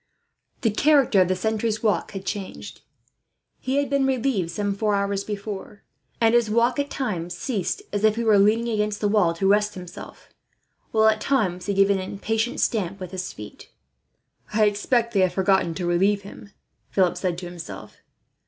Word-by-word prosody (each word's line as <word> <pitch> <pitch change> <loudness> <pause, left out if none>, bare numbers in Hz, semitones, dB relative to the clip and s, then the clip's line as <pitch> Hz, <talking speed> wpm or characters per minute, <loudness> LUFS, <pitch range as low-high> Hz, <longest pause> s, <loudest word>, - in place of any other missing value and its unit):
The 225 - +2
character 275 -4 +4
of 180 - +3
the 185 - +1
sentry's 220 +3 -1
walk 215 -1 0
had 195 -1 -6
changed. 200 -2 -6 0.8
He 260 - -2
had 285 0 +1
been 275 -1 +1
relieved 250 -9 0
some 200 +3 -2
four 210 +1 0
hours 200 0 -1
before, 205 0 -6 0.4
and 225 -1 +3
his 240 -2 +3
walk 235 +4 +2
at 285 0 -1
times 180 -11 -3
ceased, 240 - -2
as 205 0 -1
if 215 -1 +4
he 235 - -2
were 215 -3 +5
leaning 225 +4 +3
against 210 -1 -1
the 210 - +1
wall 200 -5 +2
to 195 +3 0
rest 210 +1 +2
himself, 180 -2 -10 0.6
while 220 -1 +3
at 215 0 +2
times 190 -10 0
he 200 - 0
gave 195 +1 +4
an 195 - +1
impatient 220 +5 -2
stamp 200 -3 -1
with 185 -2 -7
his 185 -1 -4
feet. 105 0 -11 0.8
"I 215 0 +3
expect 230 +3 +1
they 200 - +2
have 185 -1 +3
forgotten 190 -3 +2
to 180 - -3
relieve 195 +4 +2
him," 200 +1 -12 0.4
Philip 180 -2 +2
said 180 -1 -2
to 180 - -6
himself. 175 -2 -9
205 Hz, 180 wpm, -24 LUFS, 190-225 Hz, 0.8 s, were